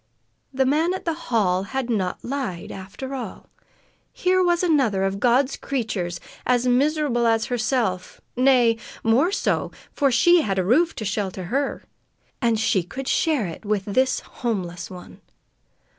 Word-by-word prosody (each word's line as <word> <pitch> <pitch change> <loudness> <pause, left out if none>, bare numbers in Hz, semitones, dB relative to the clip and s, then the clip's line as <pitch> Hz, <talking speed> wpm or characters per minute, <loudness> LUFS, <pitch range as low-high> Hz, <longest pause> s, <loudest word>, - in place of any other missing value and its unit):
The 265 0 +1
man 315 +7 +2
at - - -7
the 335 - +1 0.2
hall 190 -6 +2
had 265 +5 -3
not 195 -6 -2
lied, 245 -10 -4
after 195 +8 -7
all. 260 -2 -7 0.6
Here 370 0 +2
was 350 0 +2
another 265 - +2
of 195 0 -1
God's 255 +4 +3
creatures 205 -10 -3 0.2
as 250 -1 +2
miserable 260 -1 +2
as 225 -1 +2
herself 230 -6 -1 0.2
nay, 250 -3 +4 0.3
more 250 +11 +3
so, - - 0 0.2
for 275 -2 +2
she 345 +8 +5
had 195 -9 -1
a 185 - +1
roof 320 - +3
to 215 - -5
shelter 195 -2 -2
her! 280 +1 -1 0.6
And 230 -3 +2
she 210 -4 +2
could 260 +10 -7
share 300 -9 +1
it 170 - -7
with 205 -2 -1
this 255 +6 +1
homeless 180 -7 -4
one. 180 -1 -11
240 Hz, 150 wpm, -23 LUFS, 195-275 Hz, 0.6 s, she